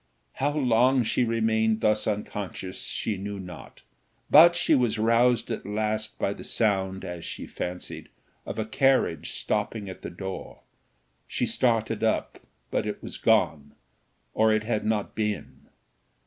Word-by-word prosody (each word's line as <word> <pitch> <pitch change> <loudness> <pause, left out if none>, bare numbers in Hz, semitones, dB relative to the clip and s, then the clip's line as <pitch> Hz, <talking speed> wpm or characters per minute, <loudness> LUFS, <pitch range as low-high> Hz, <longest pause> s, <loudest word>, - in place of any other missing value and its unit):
How 140 - 0
long 125 -1 +4
she 120 - +1
remained 110 -1 +1
thus 105 0 +2
unconscious 100 -3 -4
she 105 -3 -3
knew 100 +1 -5
not; 90 -2 -10 0.5
but 170 +3 +9
she 175 - +2
was 120 -4 +2
roused 115 +2 +3
at 115 - -3
last 110 +1 -2
by 100 - 0
the - - -10
sound, 95 -4 0
as 85 -1 -6
she - - -6
fancied, 90 0 -6 0.3
of - - -6
a 110 - -1
carriage 120 - +2
stopping 105 0 -2
at - - -11
the - - -5
door: 95 +1 -7 0.7
she - - -1
started 115 -2 +1
up, 110 - 0 0.3
but - - 0
it - - -5
was - - -7
gone, 75 -3 +2 0.6
or 110 0 +4
it 110 0 +2
had 110 -1 -1
not 105 -2 -1
been. 105 -1 -4
110 Hz, 150 wpm, -26 LUFS, 100-115 Hz, 0.7 s, but